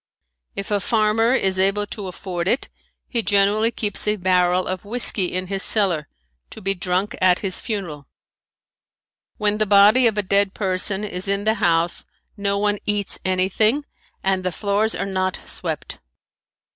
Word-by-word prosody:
If 200 +1 -6
a 205 - +2
farmer 225 +3 +2
is 190 -5 +1
able 195 +2 +2
to 205 -1 -7
afford 180 -1 -5
it 245 +7 0 0.4
he 235 - -1
generally 205 +2 +2
keeps 210 -3 -1
a 210 - +2
barrel 180 -1 +1
of 185 -1 -4
whisky 210 -3 +2
in 185 +1 -3
his 195 +1 -2
cellar, 180 -10 +3 0.4
to - - -10
be 195 -1 0
drunk 185 +2 -2
at 185 -1 +4
his 185 -2 -3
funeral. 175 - -5 1.3
When 210 0 0
the 215 - +1
body 210 +5 +6
of 220 -2 0
a 210 - +1
dead 200 0 +1
person 190 0 -1
is 190 -2 -5
in 200 +1 0
the 220 +1 +2
house 170 0 +1 0.3
no 200 -1 -1
one 205 0 0
eats 205 -1 +1
anything 195 +9 +1 0.4
and 190 -1 0
the 185 - -1
floors 205 +4 0
are - - -3
not 185 -1 -2
swept. - - -5
200 Hz, 160 wpm, -21 LUFS, 185-210 Hz, 1.3 s, body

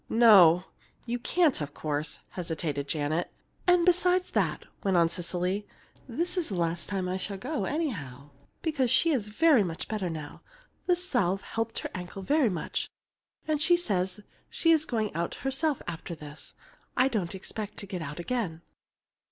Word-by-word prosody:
"No 190 -7 +7 0.4
you 240 0 -2
can't, 310 - +2
of 145 0 -5
course," 150 0 -2
hesitated 160 -5 -3
Janet. 155 +3 -1 0.4
"And 355 -1 +5
besides 360 0 +3
that," - - 0 0.2
went 190 -2 +3
on 170 -1 +5
Cecily, 180 +3 -2 0.4
"this 345 +9 -2
is 350 - 0
the 195 - -3
last 170 -1 -1
time 190 -2 -1
I 185 +1 -1
shall 195 +1 -5
go, 270 +9 -2
anyhow, 145 - -3 0.3
because 290 -6 +1
she's 260 -4 +3
very 290 +3 +5
much 175 -3 -3
better 205 -5 -2
now, 155 -3 -7 0.5
the 360 - +5
salve 240 - 0
helped 225 0 -3
her - - -2
ankle 185 +1 -6
very 285 +2 +3
much, 175 -5 -3 0.6
and 305 -1 +1
she 345 +3 +5
says 190 - -1 0.3
she's 325 -2 +3
going 220 -6 -1
out 170 +2 -2
herself 270 +2 -1
after 165 +1 -5
this. 150 -1 -7 0.4
I 255 - +5
don't 200 -8 -2
expect 205 +2 -6
to - - -5
get 185 -3 -5
out 150 +1 -6
again." 175 -5 -2
200 Hz, 160 wpm, -29 LUFS, 170-275 Hz, 0.6 s, No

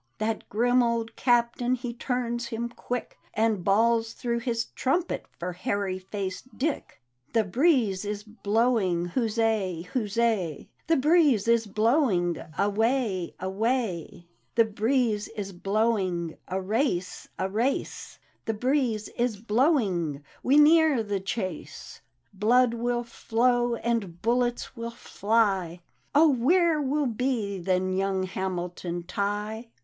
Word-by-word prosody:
" - - -44
That 220 +1 -2
grim 245 +4 +3
old 230 -1 -1
Captain 240 0 +2
he 245 -1 -5
turns 240 -1 -2
him 235 +1 -3
quick. 245 0 -5 0.2
And 220 -4 +1
bawls 225 +3 +2
through 235 -1 -2
his 230 -1 -1
trumpet 340 +7 -1
for 180 +1 -4
Hairy 185 +1 -2
faced 195 +5 -6
Dick. 290 - -3 0.3
"The 225 -1 +3
breeze 230 - +2
is 205 0 -4
blowing 215 -5 0
— - - -16
huzzal 220 -7 0
huzza! 215 - 0 0.2
The 330 - +3
breeze 285 - +4
is 230 -1 +3
blowing 215 - +2
— 155 - -18
away! 210 -2 0
away! 190 -4 -2 0.3
The 230 - +5
breeze 220 0 0
is 200 -2 -4
blowing 190 -4 0
— - - -44
a 190 - -2
race 190 -2 -1
I - - -2
a - - -2
race 235 +7 -2
I - - -35 0.2
The 225 - 0
breeze 245 -3 0
is 235 -3 -1
blowing 210 - +1
— - - -28
we 275 +3 +3
near 305 -4 +5
the 205 -2 -2
chase 190 -3 -5 0.3
1 195 - -20
Blood 240 +3 +4
will 240 +1 -1
flow, 240 +1 +1
and 225 -8 -2
bullets 240 +2 0
will 230 -1 -4
fly, 200 -6 0 0.2
— - - -30
Oh, 310 +2 +7
where 310 +5 +3
will 290 +1 0
be 230 -5 -1
then 185 +1 0
young 190 0 0
Hamilton 180 -2 -4
Tig^c? 210 +5 -3
225 Hz, 140 wpm, -27 LUFS, 195-245 Hz, 0.3 s, Oh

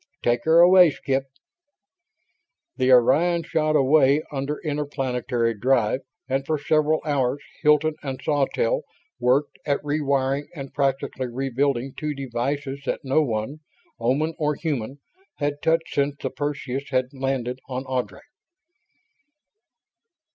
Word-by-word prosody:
Take 120 0 +1
her 165 +1 +6
away, 180 0 +8
Skip." 135 -2 -2 1.5
The 130 -1 +2
Orion 160 +8 +4
shot 155 -2 0
away 140 +1 +4
under 140 +1 -3
interplanetary 135 -6 -1
drive 120 +1 +1 0.3
and 135 +1 0
for 155 +2 -1
several 155 +1 +1
hours 140 -2 0 0.2
Hilton 150 +1 +4
and 135 -3 -5
Sawtelle 155 - 0 0.4
worked 130 +4 +1
at 140 -1 0
re 150 +1 0
wiring 140 0 0
and 135 -3 -8
practically 135 -2 -1
rebuilding 135 +1 -1
two 150 -1 -4
devices 135 +2 -3
that - - -1
no 135 +3 +2
one, 120 +2 -2 0.4
Oman 140 +8 +1
or 150 -1 +1
human, 140 -5 -3 0.4
had 145 0 -2
touched 165 0 +1
since 140 0 +1
the - - -3
Perseus 140 -2 -4
had 130 0 0
landed 130 -2 -2
on 130 +1 -4
Ardry. 130 -2 -3
140 Hz, 125 wpm, -24 LUFS, 130-150 Hz, 1.5 s, away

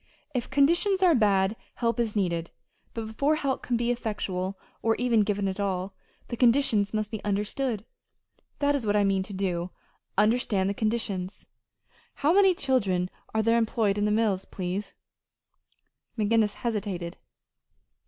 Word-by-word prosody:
If 250 -3 -2
conditions 340 +8 +3
are 355 -2 +6
bad, 205 -4 +3 0.2
help 235 0 0
is 225 -3 -1
needed; 170 -4 0 0.5
but 225 -1 -3
before 280 +8 +1
help 275 -4 -1
can 245 - -1
be 240 +1 0
effectual, 195 -5 -3 0.2
or 225 0 +2
even 240 -3 +2
given 205 -1 0
at 190 +1 -3
all, 190 -1 -2 0.4
the 235 - -3
conditions 235 -4 +3
must 215 0 -2
be 220 - -5
understood. 210 +3 -1 0.7
That 285 0 +2
is 280 -4 -1
what 205 -1 +1
I 205 - +4
mean 195 -1 +2
to 195 +2 -7
do 180 -2 -2 0.5
understand 210 -3 +2
the - - -2
conditions. 205 -4 -2 0.7
How 295 +4 +2
many 385 -1 +5
children 195 - 0 0.2
are 220 - +2
there 230 +1 +3
employed 220 -3 +1
in 205 - +1
the 210 - +1
mills, 210 -3 +1
please?" 190 +2 -5 1.2
McGinnis 215 -1 +2
hesitated. 200 -7 -3
215 Hz, 150 wpm, -27 LUFS, 195-240 Hz, 1.2 s, are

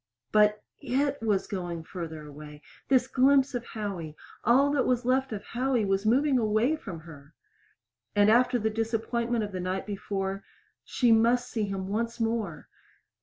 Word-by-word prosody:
But 210 0 +3 0.2
it 280 +1 -1
was 205 -4 +1
going 175 -4 -5
farther 160 -3 -7
away 150 0 -11 0.2
this 260 -2 +4
glimpse 270 +1 +3
of 245 -1 -3
Howie 190 -8 -5 0.3
all 270 +5 +4
that 285 -3 +1
was 250 -1 +1
left 260 +1 +1
of 205 -2 -5
Howie 245 -1 0
was 195 +2 0
moving 265 +3 +3
away 220 +6 +2
from 190 - -8
her! 150 -3 -14 0.8
And 205 +1 +5
after 245 +2 +4
the 220 -1 -1
disappointment 225 +1 -1
of 205 - -5
the 185 - -4
night 185 +1 -3
before 195 -1 -4 0.4
She 245 -2 +1
must 240 +2 +3
see 220 -3 -1
him 195 -1 -4
once 230 +4 -2
more! 225 -9 -2
220 Hz, 160 wpm, -28 LUFS, 195-245 Hz, 0.8 s, And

